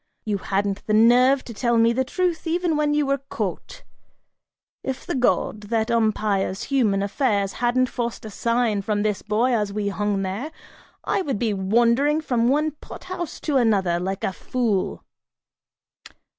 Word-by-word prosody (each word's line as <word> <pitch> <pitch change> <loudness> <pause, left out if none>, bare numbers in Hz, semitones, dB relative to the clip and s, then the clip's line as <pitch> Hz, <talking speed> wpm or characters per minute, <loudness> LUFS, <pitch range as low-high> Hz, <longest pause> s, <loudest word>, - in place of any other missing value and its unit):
You 205 -2 -1
hadn't 195 +1 -1
the 215 - +2
nerve 250 +4 +5
to 235 - -9
tell 235 +1 +1
me 230 +1 +4
the 260 +2 +1
truth 345 +3 -2
even 340 0 0
when 295 0 +1
you 295 -1 +2
were 275 0 0
caught! 275 - -5 1.0
If 265 -1 -4
the - - -3
god, 245 -4 +1
that 225 0 0
umpires 210 -4 0
human 215 -8 +1
affairs 200 -2 0
hadn't 245 +1 +3
forced 240 -2 -4
a 215 - -7
sign 230 -2 0
from 205 +1 -1
this 210 -2 -1
boy 220 +5 +1
as 210 -3 +1
he 200 0 -2
hung 200 0 -1
there, 205 +11 -4 0.5
I - - 0
would 275 - -2
be 220 0 0
wandering 235 +9 +2
from 245 -6 0
one 300 +4 +2
pot 295 - -12
house 370 -3 -5
to 295 -3 +1
another, 195 -8 +2
like 190 +2 -3
a 190 - -1
fool!" 225 -6 -2
230 Hz, 165 wpm, -23 LUFS, 205-265 Hz, 1.0 s, nerve